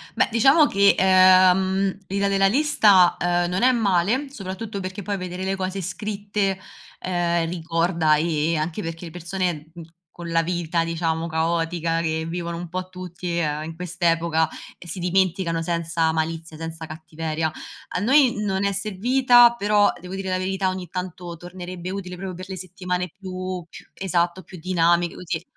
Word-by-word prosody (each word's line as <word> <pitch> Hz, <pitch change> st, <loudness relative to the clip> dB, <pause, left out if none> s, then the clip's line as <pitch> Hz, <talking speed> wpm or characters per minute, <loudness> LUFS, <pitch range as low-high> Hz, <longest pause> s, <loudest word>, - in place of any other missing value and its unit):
Beh, -, -, +3 dB
diciamo 270 Hz, +7 st, +5 dB
che, 200 Hz, 0 st, +5 dB
ehm, 185 Hz, +1 st, +5 dB
l'idea 200 Hz, +1 st, 0 dB
della 195 Hz, 0 st, +2 dB
lista, 205 Hz, -, +5 dB
ehm, 175 Hz, 0 st, +1 dB
non 185 Hz, +5 st, -1 dB
è 255 Hz, -, +6 dB
male, 225 Hz, +4 st, +1 dB
soprattutto 200 Hz, -3 st, -6 dB
perché 185 Hz, +2 st, -5 dB
poi 200 Hz, +1 st, -3 dB
vedere 180 Hz, 0 st, -5 dB
le 190 Hz, +1 st, -1 dB
cose 190 Hz, 0 st, -3 dB
scritte, 200 Hz, +1 st, -2 dB, 0.4 s
ehm, 170 Hz, -2 st, 0 dB
ricorda, 165 Hz, -1 st, +1 dB
ehm, 160 Hz, 0 st, 0 dB
anche 165 Hz, +6 st, -3 dB
perché 165 Hz, +1 st, -6 dB
le 165 Hz, -, -8 dB
persone, 170 Hz, -2 st, -3 dB
mhmm, 170 Hz, -, -9 dB, 0.3 s
con 170 Hz, -1 st, -8 dB
la 165 Hz, 0 st, +2 dB
vita 170 Hz, -1 st, -1 dB
diciamo 165 Hz, 0 st, -1 dB
caotica 165 Hz, 0 st, 0 dB
che 160 Hz, -1 st, -1 dB
vivono 170 Hz, 0 st, -4 dB
un 175 Hz, 0 st, -7 dB
po' 185 Hz, +1 st, -4 dB
tutti, 180 Hz, -1 st, -5 dB
ehm, 150 Hz, -2 st, -1 dB
in 160 Hz, +1 st, -7 dB
quest'epoca, 170 Hz, -2 st, 0 dB, 0.3 s
ehm, 175 Hz, -, -13 dB
si 175 Hz, +3 st, -5 dB
dimenticano 180 Hz, -2 st, +1 dB
senza 165 Hz, -1 st, 0 dB
malizia, 160 Hz, 0 st, -3 dB
senza 165 Hz, 0 st, -6 dB
cattiveria. 160 Hz, 0 st, -4 dB, 0.4 s
A -, -, +1 dB
noi 260 Hz, +3 st, +4 dB
non 195 Hz, -1 st, -1 dB
è 200 Hz, -, +2 dB
servita, 240 Hz, +5 st, +4 dB
però 205 Hz, -1 st, +3 dB
devo 180 Hz, +1 st, -9 dB
dire 195 Hz, 0 st, -4 dB
la 185 Hz, -, +1 dB
verità 190 Hz, +1 st, -1 dB
ogni 185 Hz, -1 st, -5 dB
tanto 180 Hz, -1 st, -6 dB
tornerebbe 180 Hz, +1 st, -8 dB
utile 185 Hz, -1 st, -5 dB
proprio 185 Hz, 0 st, -6 dB
per 185 Hz, +1 st, -8 dB
le 190 Hz, -, -5 dB
settimane 180 Hz, 0 st, -4 dB
più 185 Hz, -2 st, -5 dB
più -, -, -13 dB
esatto, 175 Hz, -1 st, -1 dB
più 180 Hz, +1 st, -12 dB
dinamiche, 175 Hz, -1 st, +2 dB
così. 175 Hz, -2 st, -4 dB
180 Hz, 165 wpm, -23 LUFS, 165-190 Hz, 0.4 s, è